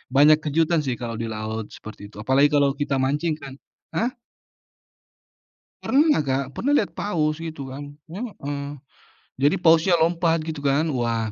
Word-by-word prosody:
banyak 150 +2 +7
kejutan 160 +1 +1
sih 130 -3 -3
kalau 115 -1 -4
di 115 0 -4
laut 110 0 -5
seperti 110 -1 -11
itu, 105 - -12
apalagi 135 +6 +3
kalau 140 -2 +3
kita 140 -2 -1
mancing 150 +4 0
kan 135 -1 -9 0.4
hah? 235 +3 +1 1.7
Pernah, 295 +3 +4
Kak. 135 0 0
Pernah 285 +4 +1
lihat 205 - 0
paus 155 -6 0
gitu 160 -5 -6
kan, 145 +2 -8 0.2
heeh. 155 - -5 0.7
Jadi 145 +6 +3
pausnya 165 +2 +5
lompat, 165 0 +2
gitu 155 -2 -4
kan. 140 +3 +2
Wah, 115 -3 -1
145 Hz, 150 wpm, -23 LUFS, 130-165 Hz, 1.7 s, banyak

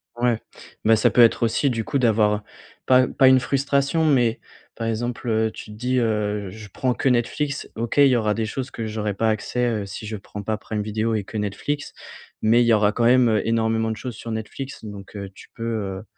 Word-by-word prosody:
Ouais, 120 -1 +1 0.4
mais 110 +1 +5
ça 110 - +3
peut 125 - +5
être 115 0 +5
aussi 115 +5 +2
du 115 -3 -2
coup 140 - -1
d'avoir 105 -3 +2 0.4
pas 130 0 +5
pas 135 - +4
une 130 0 +7
frustration, 140 +4 +1
mais 125 -7 +2 0.4
par 115 0 -3
exemple, 120 +2 -3
heu, 110 0 +1
tu - - -10
te 105 - -12
dis, 125 +3 -1
heu: 105 -3 -1
«Je 105 +2 -10
prends 125 +6 -1
que - - -1
Netflix, 135 +4 -1
OK 115 +3 -3
il 140 -1 +7
y 130 - +3
aura 110 -3 +1
des 110 +1 -1
choses 130 +4 -5
que 115 - -5
j'aurais 105 -1 -2
pas 110 +2 +1
accès, 115 +3 -1
heu, 110 -4 -1
si 100 +2 -7
je 110 0 -4
prends 105 +1 -8
pas 110 +1 -1
Prime 110 0 -4
Video 110 +2 -1
et 105 -3 -1
que 110 - -7
Netflix, 125 +8 -3 0.5
mais 115 +3 +4
il - - +1
y 115 - +5
aura 105 -1 +4
quand 120 - 0
même, 125 0 +5
heu, 110 -1 +1
énormément 110 0 +1
de 110 - -4
choses 125 0 -6
sur 115 - -8
Netflix.» 110 +5 -6
donc, 100 -1 -10
heu, 100 -1 -6
tu - - -14
peux, 115 - -7
heu 100 -4 -3
115 Hz, 230 wpm, -23 LUFS, 105-125 Hz, 0.5 s, une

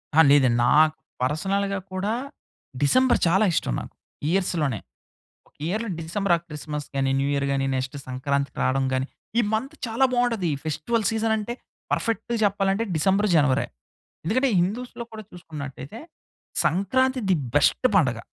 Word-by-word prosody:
అహా! 160 - +8
లేదండి. 130 -4 +5
నా 120 - +3 0.5
పర్సనల్‌గా 195 +8 0
కూడా 190 +3 -1 0.7
డిసెంబర్ 255 - +4
చాలా 190 +6 +4
ఇష్టం 60 - 0
నాకు. - - -10 0.4
ఇయర్స్‌ 185 0 +1
లోనే. 130 -8 0 0.7
ఒక - - -32
ఇయర్‌లో 215 +6 -2
డిసెంబర్ 175 +3 -1
ఆర్ 165 - -9
క్రిస్మస్ 150 -1 -5
గాని, 135 -1 +1
న్యూ 135 +1 +1
ఇయర్ 140 0 0
గాని 135 0 0
నెక్స్ట్ 130 +2 -3
సంక్రాంతికి 140 +1 -2
రావడం 135 +1 +1
గాని. 130 0 0 0.3
ఈ - - +5
మంత్ 265 +8 -2
చాలా 230 +4 +1
బాగుంటది, 230 -8 +1
ఫెస్టివల్ 160 +9 -1
సీజన్ 220 0 +1
అంటే 220 +3 -3 0.4
పర్ఫెక్ట్‌గా 230 +1 -1
చెప్పాలంటే 195 +2 +1
డిసెంబర్, 195 +6 +2
జనవరే. 140 -3 +3 0.6
ఎందుకంటే 255 +8 +2
హిందూస్‌లో 235 +5 -3
కూడా 215 0 -7
చూసుకున్నట్లయితే, 150 - -8 0.7
సంక్రాంతి 260 +9 +1
ది 180 - +5 0.2
బెస్ట్ 145 - +4
పండుగ. 125 -10 +3
180 Hz, 140 wpm, -24 LUFS, 140-220 Hz, 0.7 s, అహా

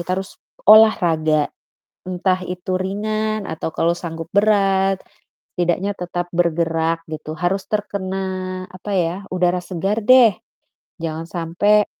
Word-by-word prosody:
kita 170 - -8
harus 190 0 -6 0.4
olahraga, 165 -8 +5 0.6
entah 185 0 0
itu 180 +1 -5
ringan 215 +2 -2
atau 160 0 -3
kalau 170 - +2
sanggup 165 -2 -7
berat 195 -2 +3 0.6
setidaknya 180 +3 0
tetap 175 -2 -4
bergerak 165 -1 0
gitu. 155 0 -6
Harus 180 +3 -1
terkena 200 -3 -3 0.5
apa 185 +3 -9
ya, 170 -1 0 0.2
udara 180 0 +1
segar 190 +4 -2
deh. 240 0 +6 0.7
Jangan 160 0 -4
sampai 175 +5 +1
180 Hz, 115 wpm, -20 LUFS, 165-200 Hz, 0.7 s, deh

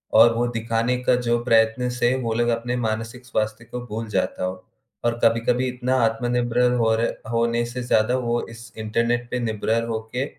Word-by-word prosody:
और 115 +1 +7
वो 120 +1 +1
दिखाने 115 +1 0
का 125 - +4
जो 120 -1 +1
प्रयत्न 115 +1 +3
से, 120 0 +1
वो 115 -4 -2
लोग 120 +1 +1
अपने 120 +1 -3
मानसिक 115 +3 -4
स्वास्थ्य 110 0 -2
को 125 - -4
भूल 110 +1 -4
जाता 95 -2 -1
हो 95 0 -5 0.4
और 120 0 0
कभी-कभी 120 +3 +2
इतना 125 +1 -1
आत्मनिर्भर 120 +1 +1
होरे 115 +1 +2 0.3
होने 115 0 +1
से 125 - -3
ज़्यादा 120 +1 +2
वो 120 -1 0
इस 115 -1 -11
इंटरनेट 115 +2 -1
पे 125 - -1
निर्भर 115 0 0
होके 115 +4 -3
115 Hz, 175 wpm, -23 LUFS, 115-125 Hz, 0.4 s, और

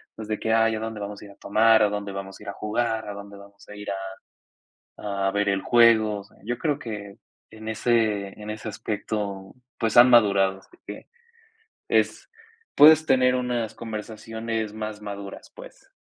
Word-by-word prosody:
pues, 110 -1 -8
de 110 - -3
que: 110 0 0
"Ay, 115 0 +3
¿a - - -4
dónde 110 -1 -5
vamos 100 0 -6
a - - -10
ir 100 - -13
a - - -17
tomar? 110 +1 +4
¿A 105 - +3
dónde 100 -1 -4
vamos 95 0 -7
a - - -13
ir 100 - -7
a - - -4
jugar? 110 0 -2
¿A 105 - -5
dónde 100 0 -10
vamos 100 0 -16
a 105 - -9
ir 105 0 -7 0.9
a 100 -2 -5
a - - +1
ver 100 0 0
el 100 -1 0
juego?". 110 -3 +4
O - - -10
sea, - - -23
yo 120 +1 -2
creo 150 -3 -1
que 105 -3 -7 0.4
en 110 0 -8
ese 110 -3 0
en 105 - -7
ese 110 +1 -7
aspecto, 105 -2 -4 0.2
pues 110 -1 0
han 125 +1 +9
madurado, 100 -5 +4
así 360 - -22
que - - -9 0.8
es - - +1 0.5
puedes 155 +1 +7
tener 125 -1 +4
unas 120 -3 -2
conversaciones 110 0 -5
más 110 -1 -6
maduras, 100 -1 -8
pues. - - -14
110 Hz, 190 wpm, -25 LUFS, 100-115 Hz, 0.9 s, han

